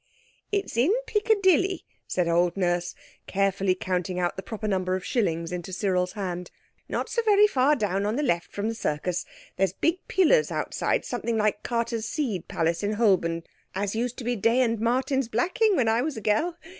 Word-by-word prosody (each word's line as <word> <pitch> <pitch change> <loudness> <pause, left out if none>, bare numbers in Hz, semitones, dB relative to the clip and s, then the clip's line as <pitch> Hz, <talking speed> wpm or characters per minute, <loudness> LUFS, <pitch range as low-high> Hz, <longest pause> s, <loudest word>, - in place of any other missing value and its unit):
"It's 400 - -2
in 260 +10 +4
Piccadilly," 390 -4 +2 0.2
said 180 -2 0
old 175 +2 +2
Nurse, 175 -2 0 0.3
carefully 195 -1 +1
counting 180 0 -2
out 175 -1 0
the 190 - -5
proper 215 +2 -5
number 185 -2 0
of 185 - -5
shillings 170 -8 -1
into 180 +1 -5
Cyril's 185 -1 0
hand, 180 -3 -4 0.4
"not - - -2
so 470 - 0
very 420 -2 +5
far 285 -6 +3
down 200 -4 -1
on 215 - -1
the 295 - 0
left 170 -11 0
from 205 +1 -3
the 225 - -1
Circus. 175 -3 -2 0.3
There's 190 -2 +1
big 335 - 0
pillars 385 +6 +3
outside, - - -1
something 235 -1 -2
like 210 -1 +1
Carter's 230 -1 -2
seed 230 - -2
place 165 +1 0
in 205 +1 -1
Holborn, 185 -7 +2 0.3
as 200 +1 -1
used 245 +2 -2
to - - -6
be 245 +1 0
Day 230 +4 +2
and 230 -3 +1
Martin's 260 +3 +1
blacking 375 - +2
when 245 -7 +2
I 225 +2 +3
was 290 -1 -3
a - - -5
gell. 315 - +1
215 Hz, 185 wpm, -26 LUFS, 185-260 Hz, 0.4 s, very